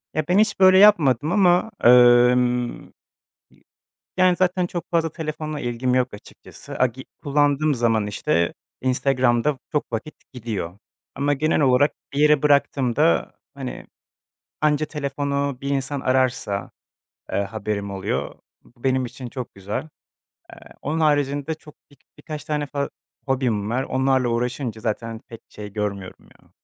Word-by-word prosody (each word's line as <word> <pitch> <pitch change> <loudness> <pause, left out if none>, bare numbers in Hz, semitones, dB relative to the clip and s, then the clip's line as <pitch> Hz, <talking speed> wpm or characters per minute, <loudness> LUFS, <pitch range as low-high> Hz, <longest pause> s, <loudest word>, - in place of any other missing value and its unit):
E, 155 -1 -1
ben 180 - +3
hiç 215 - +2
böyle 185 0 +7
yapmadım 160 - +5
ama 180 +2 +3
emm, 125 0 +5 0.7
yi - - -27 0.5
Yani, 185 -1 +4
zaten 180 0 +1
çok 175 -1 -6
fazla 165 -1 +1
telefonla 155 -2 -5
ilgim 125 +1 -1
yok 125 -2 +1
açıkçası. 105 - -11
Agi 130 +1 0 0.2
kullandığım 145 +1 +2
zaman, 115 -3 +1
işte, 85 -4 0 0.3
Instagram'da 130 +1 +1
çok 150 - -2
vakit 115 +7 -4 0.2
gidiyor. 105 -7 -5 0.4
Ama 145 +1 +1
genel 155 +3 +1
olarak 135 +1 +4 0.2
bir 140 - -2
yere 150 -1 +5
bıraktığımda, 135 - +2 0.2
hani, - - -7 0.7
anca 155 0 +2
telefonu 140 -2 -2
bir 140 - -3
insan 140 0 -2
ararsa, 130 -7 0 0.6
eee, 100 - +1
haberim 100 0 -4
oluyor. 95 -1 -3 0.3
Bu 120 0 -24
benim 130 -1 +1
için 125 +1 -8
çok 125 0 -7
güzel. 105 +10 -5 0.6
Eee, - - -12 0.2
onun 155 +3 -2
haricinde 145 0 +1
çok 155 -1 -16 0.2
bir 145 - -20 0.2
birkaç 150 -3 -7
tane 150 -2 -2
fa 140 0 -3 0.4
hobim 120 -6 0
var. 125 +3 0
Onlarla 130 -1 +1
uğraşınca 120 -1 -2
zaten 115 0 -3
pek 115 - -10
şey 105 -1 -9
görmüyorum 100 -2 -5 0.2
ya. - - -27
130 Hz, 135 wpm, -22 LUFS, 120-150 Hz, 0.7 s, böyle